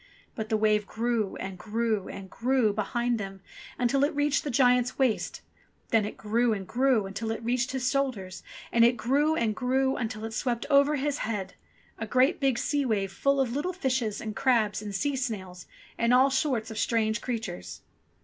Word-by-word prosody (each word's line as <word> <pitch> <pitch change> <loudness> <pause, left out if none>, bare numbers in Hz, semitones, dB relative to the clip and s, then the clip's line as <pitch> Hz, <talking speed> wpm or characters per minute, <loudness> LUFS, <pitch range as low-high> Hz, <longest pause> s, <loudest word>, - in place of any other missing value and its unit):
But 220 -3 -5
the 220 - +2
wave 210 -1 +2
grew, 230 -3 -1
and 190 -1 -6
grew, 220 -1 -1
and 195 -1 -8
grew 240 0 +1
behind 235 +3 -1
them, 195 -1 -6 0.4
until 250 +3 +2
it 295 +2 +1
reached 290 0 +1
the 295 - -3
giant's 250 -1 +3
waist; 255 -5 0 0.5
then 225 -2 +3
it 210 - -6
grew 230 +2 +1
and 195 -3 -5
grew 250 -4 +2
until 200 +3 -4
it 225 0 -3
reached 250 +2 0
his 260 -1 -1
shoulders; 220 -10 -2 0.3
and 235 - +4
it 240 +1 +4
grew 285 +7 +2
and 225 -7 0
grew 265 +2 +1
until 220 -2 -4
it 225 - -6
swept 235 +1 -1
over 280 +1 +5
his 290 +1 -1
head: 200 -4 -3 0.5
a 225 - -4
great 255 +8 +3
big 270 -4 +2
sea 285 +3 0
wave 205 -6 0
full 275 +7 +1
of 255 -3 +1
little 300 +7 -2
fishes 255 - -1
and 215 -1 -5
crabs 220 -6 +2
and 205 -2 -6
sea 280 +8 0
snails 195 -8 -5 0.3
and 235 +1 +4
all 265 +2 +5
sorts 260 -5 0
of 220 - -5
strange 220 -1 +1
creatures. 90 - -5
235 Hz, 190 wpm, -28 LUFS, 215-265 Hz, 0.5 s, over